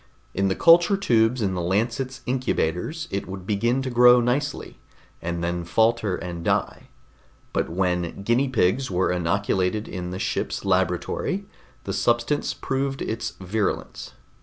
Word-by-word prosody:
In 95 +1 +1
the 95 - 0
culture 175 +4 +6
tubes 115 - +2
in 95 -2 0
the 90 - -2
Lancet's 115 +8 -1
incubators, 130 - -1
it 100 - -3
would 95 -1 -7
begin 120 +6 0
to 130 - -3
grow 125 0 +7
nicely, 135 +5 -2 0.4
and 85 0 -3
then 85 0 -2
falter 110 +2 +1
and 85 -2 -6
die, - - -1 0.7
but - - 0
when 90 +1 -1
guinea 120 +6 +2
pigs 125 +2 +1
were 90 -1 +1
inoculated 95 +3 0
in 90 -1 -5
the 90 - -5
ship's - - -2
laboratory, 95 - 0 0.4
the - - -4
substance 120 +5 +1
proved 135 0 -2
its 110 - -3
virulence. 100 +2 -3
105 Hz, 140 wpm, -24 LUFS, 90-125 Hz, 0.7 s, grow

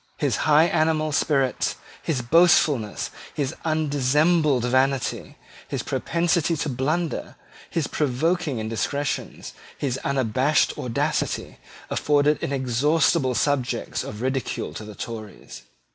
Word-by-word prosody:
His 140 -7 0
high 150 +1 +7
animal 155 -2 +1
spirits, 135 -3 +1 0.3
his 135 -7 -2
boastfulness, 145 -6 +3 0.2
his 140 -3 -1
undissembled 150 -2 +2
vanity, 130 +1 0 0.3
his - - -3
propensity 170 -1 0
to 150 - -2
blunder, 150 +6 -2 0.3
his 165 -4 -1
provoking 155 +2 0
indiscretion, 115 +6 -3 0.3
his 135 -2 -2
unabashed 135 +2 +1
audacity, 120 -2 -2 0.3
afforded 145 0 +2
inexhaustible 135 +2 +1
subjects 145 -3 -1
of 105 +3 -7
ridicule 130 -1 -2
to - - -7
the 105 -1 -10
Tories. 110 -2 -8
140 Hz, 100 wpm, -24 LUFS, 125-155 Hz, 0.3 s, high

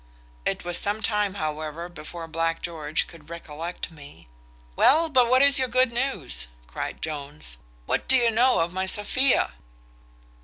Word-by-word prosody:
It - - -2
was 175 0 0
some 205 +2 -2
time, 210 -2 0
however, 155 0 -4
before 170 0 -8
Black 165 0 -2
George 155 -3 -1
could 160 -2 -15
recollect 170 +1 -6
me." 145 - -14 0.5
"Well, 320 +4 +4
but 250 -5 +4
what 255 +2 +5
is 280 -1 +8
your 260 - +1
good 255 0 +2
news?" 180 - -2 0.2
cries - - -5
Jones; 145 - -4 0.3
"what - - -1
do 265 - +5
you 240 -2 +4
know 245 -1 +3
of 170 +1 -2
my 190 +1 -2
Sophia?" 245 +7 +2
175 Hz, 155 wpm, -25 LUFS, 155-240 Hz, 0.5 s, is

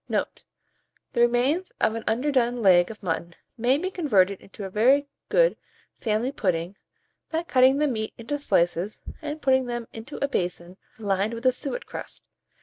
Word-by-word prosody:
Note. - - -2 0.7
The 235 - +1
remains 250 +10 +2
of 220 - +2
an 225 0 -4
underdone 245 -1 +1
leg 175 -2 +6
of 215 -2 -10
mutton 170 0 -3 0.2
may 250 +3 +2
be 370 +5 -3
converted 200 - +2
into 200 +1 -10
a - - -5
very 260 +8 +4 0.2
good - - +4 0.4
family 225 +3 0
pudding, 180 -6 -1 0.5
by 325 +1 -1
cutting 260 -3 +4
the 300 - +2
meat 220 -6 -2
into 290 +6 -4
slices, 175 - +1 0.2
and 305 0 -5
putting 260 -1 +3
them 240 -1 -4
into 225 +6 -8
a 280 - 0
basin 180 -6 -3 0.2
lined 205 +1 0
with 230 +2 -8
a 255 - +6
suet 280 - -3
crust. - - -8
235 Hz, 165 wpm, -25 LUFS, 200-280 Hz, 0.7 s, leg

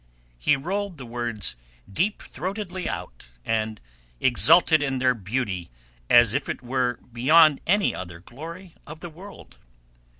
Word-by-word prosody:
He - - +3
rolled 190 +5 -3
the 130 - -8
words 115 - -2 0.3
deep 185 - -1
throatedly 185 -1 -5
out, - - -7 0.2
and 110 -1 -1 0.4
exulted 155 +5 +5
in 135 -2 -1
their 130 0 +3
beauty 100 - -3 0.4
as - - +6
if - - -2
it - - -4
were 125 0 0 0.2
beyond 150 +5 +5
any 205 +3 +3
other 85 -2 -7
glory 165 - -10
of 155 +2 -10
the 175 - -7
world. 190 +5 -13
135 Hz, 135 wpm, -25 LUFS, 120-175 Hz, 0.4 s, as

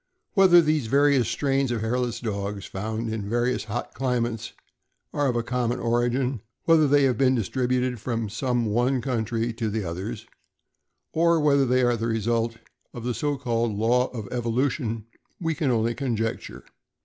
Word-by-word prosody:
Whether 185 -4 +7
these 155 -5 +1
various 140 -1 +3
strains 135 +3 0
of 115 -3 -1
hairless 120 +1 -1
dogs 100 -3 -4
found 110 +3 -4
in 110 - -3
the 100 - -6
various 120 +1 0
hot 110 +3 -4
climates 120 -4 -2 0.6
are 145 -1 +1
of 125 - 0
a 120 - 0
common 125 0 -1
origin, 120 +1 0 0.2
whether 160 -2 +5
they 145 0 +4
have 130 -2 +2
been 130 -1 +4
distributed 125 +2 0
from 115 0 -2
some 120 +2 -1
one 120 +5 +1
country 115 -2 -1
to 115 -1 -2
the 110 0 -2
others, 100 +6 -5 0.9
or 170 0 +3
whether 140 -3 +3
they 125 +1 +3
are 120 -1 +3
the 115 0 -2
result 115 +1 0 0.4
of 120 - -6
the 125 0 -1
so 145 +3 -1
called 120 -4 -1
law 125 +4 +2
of 110 -5 -7
evolution, 120 -1 -1 0.3
we 165 -2 -1
can 150 -2 -1
only 115 -1 +1
conjecture. 115 -4 -3
120 Hz, 165 wpm, -25 LUFS, 115-130 Hz, 0.9 s, Whether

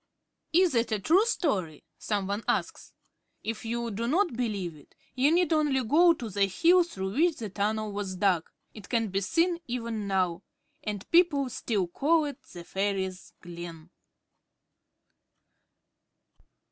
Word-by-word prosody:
Is 355 0 +4
it 235 -1 +1
a 215 - +1
true 370 - +3
story? 185 - -1 0.2
some 205 -3 -1
one 200 +3 -3
asks. - - -2 0.5
If 225 0 -4
you 235 0 -2
do 230 +3 -3
not 345 +4 +2
believe 205 -9 -2
it, 145 - -19 0.2
you 265 +4 +3
need 345 -1 +3
only 295 -4 +2
go 335 +9 +5
to 245 -7 -6
the 200 -1 +1
hill 340 - +4
through 190 - -5
which 325 +5 +3
the 215 -4 -6
tunnel 210 +2 -1
was 200 -2 -4
dug. 180 -3 +1 0.2
It 210 -3 -12
can 225 -3 0
be 195 +1 -1
seen, 335 - +1
even 230 -4 -3
now. 185 -3 0 0.4
And 205 -2 -4
people 330 -6 +4
still 205 -6 -1
call 305 - +2
it 285 0 -6
the 175 - -9
Fairies' 190 0 -3
Glen. 170 -1 -9
220 Hz, 145 wpm, -28 LUFS, 195-295 Hz, 0.5 s, go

